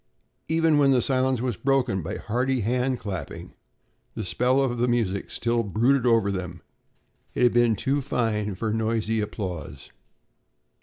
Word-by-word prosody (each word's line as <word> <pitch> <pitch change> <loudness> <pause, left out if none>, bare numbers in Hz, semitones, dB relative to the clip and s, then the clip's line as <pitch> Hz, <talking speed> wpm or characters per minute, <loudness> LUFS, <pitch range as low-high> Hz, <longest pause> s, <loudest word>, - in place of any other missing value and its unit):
Even 160 -2 +3
when 140 -1 +4
the 130 -2 +4
silence 130 -1 +1
was 125 -4 -2
broken 135 -8 +1
by 80 - -5
hearty 125 +3 -1
hand 125 +4 0
clapping, 95 -10 -7 0.6
the 110 - -4
spell 125 +7 +1
of 125 -3 0
the 120 - +2
music 110 -5 -1
still 120 0 0
brooded 120 +5 +1
over 115 -4 +3
them. 90 -3 -5 0.7
It - - +1
had 120 - +4
been 120 -2 +3
too 140 +7 -1
fine 110 -6 -1
for 110 +3 -2
noisy 110 0 0
applause. 90 - -6
115 Hz, 150 wpm, -25 LUFS, 105-130 Hz, 0.7 s, when